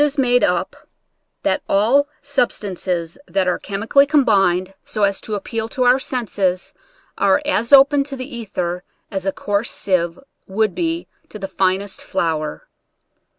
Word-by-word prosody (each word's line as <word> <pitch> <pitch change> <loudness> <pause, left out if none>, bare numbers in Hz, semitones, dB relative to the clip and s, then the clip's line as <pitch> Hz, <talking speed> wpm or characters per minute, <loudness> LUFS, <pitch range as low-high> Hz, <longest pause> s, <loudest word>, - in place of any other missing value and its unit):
is 295 0 +2
made 245 -2 +3
up, - - 0 0.7
that - - +1
all 235 +9 +3 0.2
substances 190 - -2
that 190 -1 0
are 180 - +1
chemi 200 +2 -5
cally 280 +4 +5
combined 195 - +2
so 215 - -2
as 200 -1 +1
to 215 - -3
appeal 220 +2 -4
to 255 - -1
our 250 +2 +5
senses, 200 -8 -1 0.5
are - - +4
as 235 -6 0
open 280 +1 +7
to 275 0 -7
the 255 -1 -6
ether 180 -5 -3 0.3
as 195 -1 -3
a - - +2
coarse 205 +4 -1
sieve 175 -3 0 0.3
would 210 0 0
be 335 0 -2 0.2
to - - -8
the 195 -2 -5
finest 190 +1 -1
flour. 165 - -2
205 Hz, 150 wpm, -20 LUFS, 190-265 Hz, 0.7 s, open